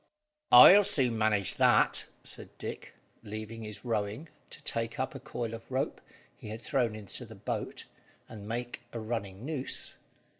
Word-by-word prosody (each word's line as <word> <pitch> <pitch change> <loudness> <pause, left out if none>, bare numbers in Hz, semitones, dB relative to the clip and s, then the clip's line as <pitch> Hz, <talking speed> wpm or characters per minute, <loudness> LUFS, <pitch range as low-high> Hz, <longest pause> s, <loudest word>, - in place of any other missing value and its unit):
"I'll 205 +2 +10
soon 135 - +2
manage 110 -3 +2
that," - - +4 0.2
said - - -5
Dick, - - -7 0.3
leaving 110 +2 -7
his 105 +2 -8
rowing 110 +6 -2 0.2
to - - -9
take 115 0 -3
up 130 0 -1
a - - -7
coil 115 -2 -5
of 115 0 -9
rope 130 +2 -2 0.3
he 105 - -10
had 110 +1 -6
thrown 120 -6 0
into 110 +3 -8
the 115 -1 -11
boat, 100 +1 -4 0.4
and 105 -2 -10
make 120 +2 -4
a 115 - -4
running 110 -2 -4
noose. 145 -3 -3
115 Hz, 155 wpm, -30 LUFS, 105-125 Hz, 0.4 s, I'll